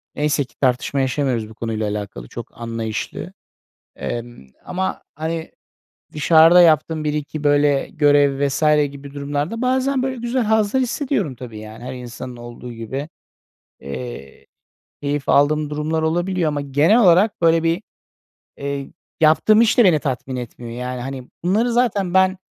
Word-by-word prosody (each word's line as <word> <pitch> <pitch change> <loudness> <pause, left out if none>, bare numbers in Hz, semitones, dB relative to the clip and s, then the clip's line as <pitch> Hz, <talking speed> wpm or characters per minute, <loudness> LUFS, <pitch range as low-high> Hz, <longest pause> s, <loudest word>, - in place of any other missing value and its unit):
neyse 150 -1 +1
ki 120 -2 -19
tartışma 130 +2 +1
yaşamıyoruz 130 -4 0
bu 110 - -13
konuyla 110 -2 -2
alakalı, 100 -13 -5
çok 120 - -10
anlayışlı. 115 -2 -4 0.6
Emm, 120 - -6 0.2
ama, 190 +1 -3
hani, 160 +2 -4 0.6
dışarıda 165 +3 +6
yaptığım 160 -1 +3
1-2 150 0 -3
böyle 145 -1 +3
görev 145 -2 +3
vs. 140 +3 -2 0.3
gibi 140 0 -11
durumlarda, 145 - -3
bazen, 260 +1 +1
böyle, 260 0 -2
güzel 240 +1 -1
hazlar 220 +3 +2
hissediyorum 245 - -1
tabii, 115 -3 -9
yani, 110 +2 -10
her 125 - -5
insanın 125 0 -8
olduğu 120 +1 -9
gibi. 130 +6 -5 0.7
Eee, 70 - -8 0.6
keyif 145 0 -2
aldığım 150 +1 +3
durumlar 150 +2 -1
olabiliyor 175 +2 0
ama 145 -1 -2
genel 145 - +3
olarak 190 +2 +4
böyle 165 -1 +4
bir, 165 +4 0 0.7
eee, 140 -1 -4 0.3
yaptığım 190 +8 +5
iş 230 +2 +3
de 240 - +7
beni 175 -7 +5
tatmin 130 -2 -3
etmiyor. 120 -1 -7
Yani, 125 +1 -4
hani, 130 0 -6
bunları 215 +7 +2
zaten 210 -7 +1
ben, 190 0 +4
145 Hz, 140 wpm, -20 LUFS, 125-175 Hz, 0.7 s, de